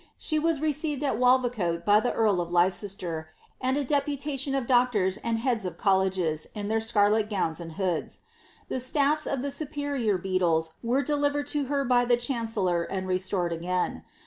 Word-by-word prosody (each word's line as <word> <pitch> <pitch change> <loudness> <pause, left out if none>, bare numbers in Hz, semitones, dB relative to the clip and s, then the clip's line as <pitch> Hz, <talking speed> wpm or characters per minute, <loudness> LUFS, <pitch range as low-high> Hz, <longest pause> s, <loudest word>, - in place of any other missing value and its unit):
She 310 -1 -1
was 320 -2 0
received 300 -1 -1
at 275 - 0
Walvicote 245 -10 +2
by 210 0 +6
the 245 - 0
earl 210 -5 +2
of 170 0 -5
Lei 175 +1 +4
ster, 180 -4 -5 0.3
and 260 +1 +1
a 290 - 0
deputation 280 -1 -1
of 270 -3 -1
doctors 235 -7 +2
and 230 +1 -2
heads 235 -2 0
of 180 -2 -5
colleges 190 -5 +1
in 205 -1 -4
their 220 0 +1
scarlet 215 -1 +2
govns 180 -6 -1
and 165 -1 -8
hoods. 180 -3 -2 0.5
The - - -3
stafli 290 +3 +2
of 270 - -2
the 280 - -2
superior 280 -7 -1
beadles 175 -3 0
were 250 +4 +1
delivered 290 0 0
to 290 -2 0
ber 280 +1 -1
by 245 -1 +3
the 240 0 +3
chancellor 225 -8 0
and 185 +2 -4
restored 185 -1 -1
again. 180 +2 -2
225 Hz, 175 wpm, -27 LUFS, 185-275 Hz, 0.5 s, by